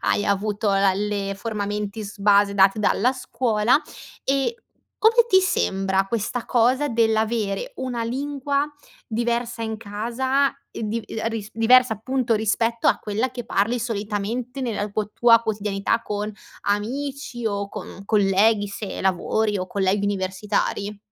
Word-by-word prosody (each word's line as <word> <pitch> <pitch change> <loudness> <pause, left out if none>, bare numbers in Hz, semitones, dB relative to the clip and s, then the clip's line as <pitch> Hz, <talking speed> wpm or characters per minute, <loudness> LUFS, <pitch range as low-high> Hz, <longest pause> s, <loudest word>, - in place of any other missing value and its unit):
hai 205 - +1
avuto 205 +1 0
la 195 -1 +3
le 200 0 -2
forma 210 0 -3
mentis 210 0 -4
base, 200 0 +4
date 195 +2 +5
dalla 235 +4 +2
scuola, 235 0 +1 0.4
e, 275 - +1 0.4
come 460 +2 +5
ti 380 -2 +6
sembra, 195 - +1
questa 230 +3 -2
cosa 255 +4 +2
dell'avere 220 -3 0
una 250 -3 -3
lingua, 280 +3 -1 0.4
diversa, 235 +1 -1
in 220 -1 -3
casa, 240 +6 0 0.2
e - - -7
div 220 +1 -2
ehm, 225 0 -3
risp 220 -2 -5
diversa, 245 +1 +5
appunto, 245 +2 0
rispetto 225 +2 0
a - - +3
quella 220 +5 -2
che 245 -2 -6
parli, 225 +2 +1
solitamente, 225 +3 -3
nella 210 -5 -2
quo 210 0 -2
tua 230 -1 +5
quotidianità, 210 0 -1
con 210 0 -3 0.3
amici, 240 +3 -2
o 200 -1 -2
con 195 - -8
colleghi, 205 +1 +3
se 200 0 -6
lavori, 200 +3 +1
o 185 - -3
colleghi 200 +1 0
universitari. 200 +1 -1
220 Hz, 135 wpm, -23 LUFS, 205-240 Hz, 0.4 s, ti